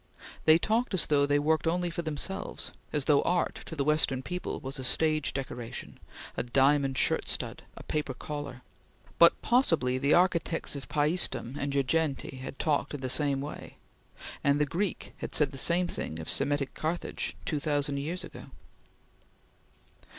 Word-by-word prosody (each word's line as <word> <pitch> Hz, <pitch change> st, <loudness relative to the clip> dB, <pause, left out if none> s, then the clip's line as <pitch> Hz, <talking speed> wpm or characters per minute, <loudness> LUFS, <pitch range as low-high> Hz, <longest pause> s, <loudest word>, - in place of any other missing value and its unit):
They 155 Hz, 0 st, +8 dB
talked 220 Hz, +3 st, 0 dB
as 180 Hz, -, +2 dB
though 140 Hz, -1 st, +3 dB
they 145 Hz, 0 st, +3 dB
worked 155 Hz, +2 st, +1 dB
only 175 Hz, +1 st, 0 dB
for 170 Hz, -, -3 dB
themselves; 165 Hz, +5 st, -4 dB, 0.2 s
as 145 Hz, -3 st, 0 dB
though 145 Hz, -2 st, +5 dB
art, 175 Hz, 0 st, 0 dB
to 160 Hz, -, -6 dB
the 140 Hz, -, 0 dB
Western 140 Hz, -3 st, +2 dB
people, 180 Hz, +5 st, -4 dB
was 135 Hz, +1 st, -5 dB
a -, -, -4 dB
stage 155 Hz, +3 st, +2 dB
decoration; 125 Hz, -3 st, -6 dB, 0.4 s
a -, -, 0 dB
diamond 135 Hz, +2 st, +3 dB
shirt -, -, +1 dB
stud; -, -, -2 dB, 0.2 s
a -, -, -9 dB
paper 150 Hz, -4 st, -2 dB
collar; 145 Hz, -2 st, -6 dB, 0.6 s
but 170 Hz, -, +7 dB
possibly 165 Hz, -, +3 dB
the 140 Hz, +2 st, +4 dB
architects 170 Hz, -3 st, +1 dB
of 140 Hz, -, -7 dB
Paestum 150 Hz, -4 st, +1 dB
and 140 Hz, -, -1 dB
Girgenti 140 Hz, 0 st, 0 dB
had 130 Hz, +1 st, -7 dB
talked 150 Hz, -1 st, 0 dB
in 140 Hz, -, -7 dB
the 130 Hz, -, -2 dB
same 140 Hz, 0 st, +1 dB
way, 145 Hz, +2 st, -7 dB, 0.7 s
and 140 Hz, +1 st, +3 dB
the 150 Hz, -, +3 dB
Greek 175 Hz, +6 st, -2 dB
had -, -, -5 dB
said 145 Hz, -3 st, +3 dB
the 135 Hz, -, -8 dB
same 175 Hz, +5 st, +2 dB
thing 80 Hz, -, -4 dB
of 80 Hz, -, -7 dB
Semitic 140 Hz, 0 st, 0 dB
Carthage 160 Hz, +3 st, -3 dB
two 150 Hz, -, -1 dB
thousand 145 Hz, -1 st, 0 dB
years 160 Hz, +6 st, -3 dB
ago. -, -, -10 dB
145 Hz, 165 wpm, -29 LUFS, 135-165 Hz, 0.7 s, They